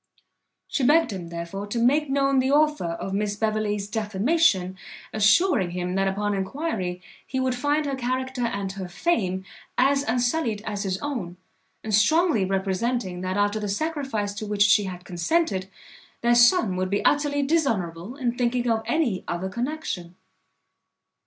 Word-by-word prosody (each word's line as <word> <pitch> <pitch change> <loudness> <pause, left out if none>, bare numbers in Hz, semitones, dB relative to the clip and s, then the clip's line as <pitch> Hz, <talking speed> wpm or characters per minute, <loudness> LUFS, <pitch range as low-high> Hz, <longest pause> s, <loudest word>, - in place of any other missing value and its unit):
She 275 - -1
begged 305 +1 +4
him, 180 -3 -6
therefore, 170 +4 -5
to 205 - -4
make 275 +5 +3
known 275 0 +2
the 260 +1 +1
author 300 - +3
of 190 +3 -5
Miss 205 +1 -1
Beverley's 210 -1 -1
defamation, 210 - +1 0.4
assuring 215 - +4
him, 180 +1 -3
that 195 +1 +1
upon 205 +2 -1
enquiry, 190 - -3 0.2
he 260 - -2
would 260 -1 +1
find 290 +4 0
her 280 - -2
character 260 0 -2
and 200 -3 -3
her 190 -1 -6
fame 190 - -1 0.3
as 275 +2 +3
unsullied 245 -2 0
as 205 -2 -3
his 190 -2 -1
own; 220 -12 -4 0.5
and 220 - -4
strongly 255 - +4
representing, 190 +1 -1
that 185 +1 -2
after 205 +1 +1
the 210 -1 -3
sacrifice 265 -4 -2
to 215 +1 -6
which 205 -1 +3
she 210 0 +4
had 180 -1 -7
consented, 190 - 0 0.5
their 235 0 +3
son 240 - +5
would 185 0 -1
be 200 +1 -1
utterly 290 -1 +2
dishonourable 230 - -1
in 245 -4 -1
thinking 245 0 0
of 225 -1 +2
any 255 - 0
other 175 +2 -3
connexion. 235 - -4
215 Hz, 155 wpm, -25 LUFS, 190-270 Hz, 0.5 s, son